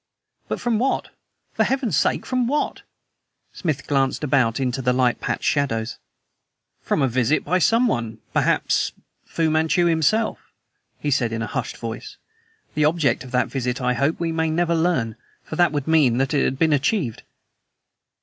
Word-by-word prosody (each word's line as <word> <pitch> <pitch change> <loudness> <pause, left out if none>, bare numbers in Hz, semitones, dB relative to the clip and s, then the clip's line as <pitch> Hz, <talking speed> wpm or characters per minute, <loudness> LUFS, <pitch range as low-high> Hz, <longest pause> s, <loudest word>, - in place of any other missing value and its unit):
"But - - -3
from 235 -3 0
what? 265 +3 0 0.4
For - - +2
Heaven's 265 -5 0
sake, - - +1
from 255 -2 0
what?" 295 +4 -1 0.7
Smith 155 -7 -3
glanced 135 0 0
about 130 -5 +2
into 130 0 -1
the 125 0 +2
light 125 -1 +2
patched - - -2
shadows. 115 -6 0 0.8
"From 145 - 0
a - - +3
visit 130 +3 +1
by 180 +5 +2
someone 145 - +1 0.2
perhaps - - +2
by - - -28 0.2
Fu 160 -1 0
Manchu 160 +2 +2
himself," 170 +7 +2 0.6
he 145 - -2
said 120 -3 +1
in 115 0 -2
a - - -6
hushed 125 -4 -3
voice. 115 0 -7 0.6
"The 150 - +1
object 155 -3 +1
of 130 - -10
that 125 - +2
visit 125 -2 -2
I 125 -1 +1
hope 140 +6 0
we 170 -1 -1
may 160 0 0
never 170 +1 +1
learn; 160 -10 0 0.3
for - - -7
that 175 -2 +3
would 145 -1 -3
mean 150 -7 +4
that 135 +3 0
it 140 - +2
had 130 - -1
been 160 +1 +3
achieved." 145 - 0
145 Hz, 170 wpm, -22 LUFS, 125-170 Hz, 0.8 s, mean